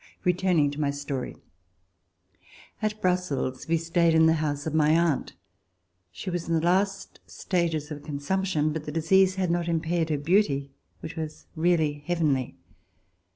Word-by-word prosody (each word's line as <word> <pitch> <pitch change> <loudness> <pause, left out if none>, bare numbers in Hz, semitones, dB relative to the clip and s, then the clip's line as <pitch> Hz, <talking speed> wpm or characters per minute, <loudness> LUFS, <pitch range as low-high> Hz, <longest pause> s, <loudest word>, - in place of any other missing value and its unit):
Returning 180 -5 +2
to 145 +1 -5
my 145 - +1
story. 140 -2 -4 1.5
At 215 0 -1
Brussels 180 -8 -1
we 165 +1 +2
stayed 165 0 +2
in 160 0 +6
the 160 - +5
house 145 -2 -2
of 160 - -3
my 155 -1 +3
aunt. 170 -5 0 0.8
She 95 - -6
was 175 -1 -3
in 165 - +2
the 160 - +1
last 195 +3 0
stages 165 -4 -2
of 145 -1 -6
consumption, 155 +2 -1
but 155 -1 -5
the 150 - -4
disease 185 +4 +3
had 185 -3 0
not 175 0 0
impaired 165 0 0
her 150 - +1
beauty, 145 -3 +1 0.3
which 160 - -7
was 155 -2 -6
really 160 -3 +1
heavenly. 150 -7 0
160 Hz, 155 wpm, -26 LUFS, 150-175 Hz, 1.5 s, in